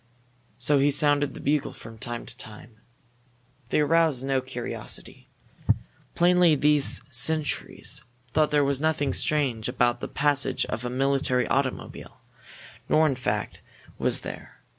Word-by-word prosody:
So 140 +3 +2
he 140 +1 +4
sounded 145 0 +2
the - - -8
bugle 145 0 0
from 115 -1 -12
time 120 0 -5
to - - -11
time. 110 +1 -11 0.9
They 150 - +2
aroused 155 -4 +2
no 135 -1 +1
curiosity. 130 -2 -7 0.9
Plainly 175 -2 +5
these 150 0 +3
sentries 150 +4 +1 0.3
thought 155 +2 +2
there 150 -1 +3
was 140 0 0
nothing 155 -3 +1
strange 130 -7 0
about 125 -1 +1
the - - -5
passage 140 -2 0
of 110 - -4
a 125 - -2
military 130 -1 +1
automobile, 135 -1 -3 0.7
nor, 155 - +4
in 145 - +2
fact, 105 -4 -3 0.4
was - - 0
there. - - -9
140 Hz, 135 wpm, -26 LUFS, 125-150 Hz, 0.9 s, Plainly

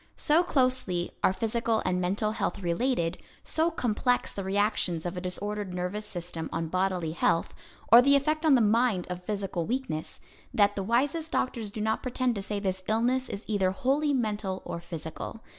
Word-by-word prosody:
So 310 +2 +4
closely 255 - 0
are - - +5
physical 225 +2 0
and 180 0 +1
mental 200 +4 0
health 220 - -2
related, 175 -1 0 0.2
so 320 +1 +1
complex 245 -4 0
the 200 - -4
reactions 190 -4 0
of 175 +1 -3
a 180 - -4
disordered 200 +1 -3
nervous 190 +4 -3
system 170 -2 -5
on 165 0 -2
bodily 185 -2 0
health, 165 0 +1 0.4
or 235 +1 +11
the 280 +2 +5
effect 305 +3 +1
on 310 -4 +6
the 245 - +4
mind 220 -3 +3
of 180 0 -5
physical 195 -4 -2
weakness, 235 -11 -3 0.4
that 205 -1 +4
the 200 - -2
wisest 275 - 0
doctors 235 -7 -1
do 210 +1 -6
not 220 +1 0
pretend 255 -1 0
to 200 - -4
say 205 +1 -3
this 190 -2 -2
illness 245 +4 +1
is 200 - -6
either 200 -3 +2
wholly 275 +10 +1
mental 210 -7 -1
or 170 - -4
physical. 170 +6 -7
210 Hz, 175 wpm, -28 LUFS, 180-250 Hz, 0.4 s, or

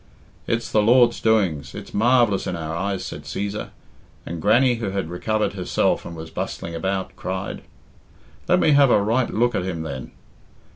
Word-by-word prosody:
"It's 115 0 -1
the 105 - +4
Lord's 120 +2 +4
doings 95 -10 +1
it's - - -9
marvellous 115 -2 +3
in - - -2
our 80 -1 -4
eyes," 95 +1 -2
said - - -6
Cæsar; 100 +1 -4 0.6
and 85 -1 -5
Grannie, 120 +6 +4
who 110 -3 -3
had 95 -3 -3
recovered 110 +5 -1
herself 95 -2 0
and 85 - -8
was 80 0 -8
bustling 85 - -5
about, 95 +3 -3
cried 95 +1 -4 0.9
"Let - - +4
me 155 - +4
have 140 -2 +6
a 120 - +5
right 115 +5 +1
look 120 +2 +1
at - - -1
him, 85 -3 -3
then. 70 -5 -6
100 Hz, 175 wpm, -23 LUFS, 85-115 Hz, 0.9 s, have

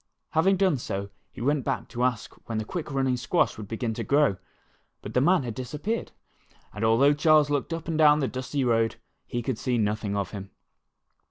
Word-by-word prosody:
Having 190 +5 +3
done 185 -6 +3
so, 100 -3 -4 0.2
he - - -10
went 140 +2 +1
back 135 -2 -2
to 120 0 -2
ask 125 -3 -1 0.2
when 115 - -2
the 110 - -2
quick 160 +4 -5
running 135 -2 +1
squash 130 +8 +1
would 105 -2 -8
begin 115 +1 -3
to - - -4
grow. 140 -8 +3 0.7
But 105 - -7
the 125 - +3
man 175 +1 +4
had 120 -2 -4
disappeared, 150 - -4 0.6
and 105 - -5
al 110 0 +4
though 140 +3 +5
Charles 150 0 +4
looked 145 +2 -1
up 165 -1 -4
and 160 -1 -1
down 150 -1 +7
the 135 - 0
dusty 130 +2 -3
road, 115 -2 +2 0.3
he 120 0 -3
could 125 -2 -2
see 125 -2 0
nothing 105 -1 -1
of 100 -2 -2
him. 100 -2 -7
130 Hz, 205 wpm, -26 LUFS, 115-150 Hz, 0.7 s, down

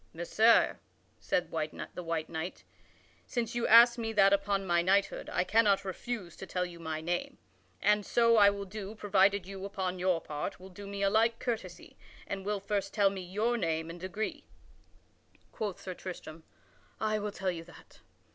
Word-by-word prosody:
"Messire," 215 +7 +3 0.4
said 175 -2 -1
the 160 +2 -4
white 165 -1 -2
knight, 165 +2 -5 0.6
"since 235 -2 -2
you 240 -1 0
ask 235 +1 +8
me 225 -1 -2
that 195 -2 +5
upon 200 0 +1
my 175 -1 +3
knighthood, 195 +3 +1
I - - +1
cannot 200 0 +3
refuse 190 -1 -5
to 190 - -8
tell 180 0 -1
you 175 -1 -10
my 160 -1 -4
name. 175 +2 -3 0.5
And 210 0 +4
so 230 +2 +3
I 205 -2 +7
will 200 0 -4
do, 205 +1 -7
provided 200 -2 +2
you, 195 0 -8
upon 190 -2 -3
your 180 -2 +2
part, 150 -2 -5
will 190 +1 -11
do 200 +2 -10
me 200 0 -4
a 195 - +4
like 225 +2 +3
courtesy 220 -7 -5 0.3
and 195 -1 -5
will 205 +1 -1
first 200 0 -3
tell 200 -3 +4
me 195 -1 -5
your 210 +7 -1
name 165 -4 -1
and 175 - -10
degree." 190 +4 -4 1.0
Quoth 205 -4 -4
Sir 185 - -6
Tristram: 165 -3 -9 0.5
"I 215 0 0
will 210 0 -3
tell 190 -2 -2
you 165 -2 -6
that. 175 - -17
195 Hz, 175 wpm, -31 LUFS, 175-210 Hz, 1.0 s, ask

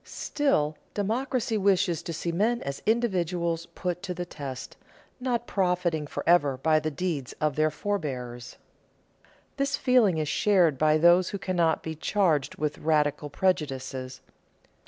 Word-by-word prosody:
Still, 155 - 0 0.2
democracy 225 +2 -1
wishes 185 -4 +2
to - - -6
see 170 +1 -3
men 220 +8 +1
as 140 0 -5
individuals 175 -7 0
put 180 -1 -3
to 185 -2 -4
the 175 0 -4
test, 135 -6 -7 0.4
not 245 -2 -1
profiting 180 -6 0
forever 145 -5 +2
by 155 +3 +3
the 155 - -2
deeds 150 -4 -3
of 150 -2 -1
their 155 0 +3
forebears. 125 -11 -4 1.0
This 275 0 0
feeling 245 - +3
is 155 -1 -1
shared 170 -4 +3
by 155 0 +4
those 175 +3 +5
who 200 - -4
cannot 175 -4 0
be 160 - -4
charged 160 -3 +1
with 150 0 -3
radical 150 -1 +1
prejudices. 135 -6 -2
170 Hz, 135 wpm, -27 LUFS, 150-195 Hz, 1.0 s, those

